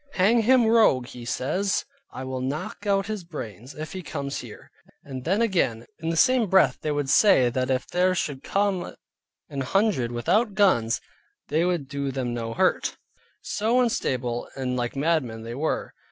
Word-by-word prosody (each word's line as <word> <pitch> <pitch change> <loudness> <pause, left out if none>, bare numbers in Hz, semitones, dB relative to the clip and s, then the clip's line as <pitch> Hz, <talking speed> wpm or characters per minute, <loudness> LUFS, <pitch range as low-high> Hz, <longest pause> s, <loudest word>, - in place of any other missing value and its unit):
Hang 220 +6 +4
him 245 +1 +5
rogue 220 - +4 0.2
(says 185 +12 0 0.3
he) - - -8
I - - -4
will 130 0 -4
knock 140 +9 -4
out 195 -1 +2
his 215 -3 -4
brains, 125 - -8
if 155 +1 -6
he 190 - -5
comes 140 -4 -4
here. 120 -4 -11 0.3
And 130 -2 -7
then 195 +7 +2
again, 165 - 0
in 165 0 -3
the 165 - -1
same 255 0 +4
breath 190 +1 +4
they 155 - -1
would 145 -1 -1
say 135 - +5
that 130 +1 -1
if 130 -1 0
there 185 +1 +1
should 145 -6 -2
come 200 -2 -1 0.5
an 140 -1 -4
hundred 170 - +1
without 195 - +1
guns, 120 - +3 0.5
they 160 +4 +2
would 175 -6 -1
do 140 0 -3
them 130 -2 -2
no 115 -1 -4
hurt. - - +1 0.4
So 225 +4 +1
unstable 125 - -1
and 130 -2 -2
like 120 0 -2
madmen 135 -7 0
they 115 +1 -6
were. 150 +5 -2
150 Hz, 175 wpm, -25 LUFS, 130-195 Hz, 0.5 s, him